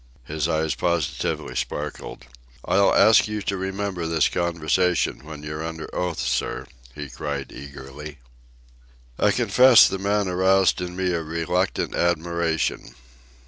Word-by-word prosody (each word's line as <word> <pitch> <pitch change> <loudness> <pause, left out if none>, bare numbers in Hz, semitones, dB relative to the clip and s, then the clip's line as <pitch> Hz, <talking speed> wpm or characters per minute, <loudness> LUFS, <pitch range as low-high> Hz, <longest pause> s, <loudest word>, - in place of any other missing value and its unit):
His 80 +3 -2
eyes 80 -1 0
positively 85 0 -2
sparkled. 75 -4 -5 0.4
"I'll 100 +1 +3
ask 110 0 +5
you 105 -1 -4
to 100 - -1
remember 95 -2 -3
this 80 -2 +2
conversation 85 0 0
when 75 -1 -9
you're 75 +1 -5
under 80 -1 -7
oath, 90 -3 -2
sir," - - -2 0.3
he 75 -1 -6
cried 70 0 -5
eagerly. 70 +2 -10 1.0
I - - +4
confess 125 -2 +6
the 95 - -3
man 100 +1 0
aroused 95 +1 +3
in 90 0 -5
me 95 -1 0
a 85 - -1
reluctant 85 +4 -1
admiration. 85 -1 -1
85 Hz, 130 wpm, -23 LUFS, 75-95 Hz, 1.0 s, confess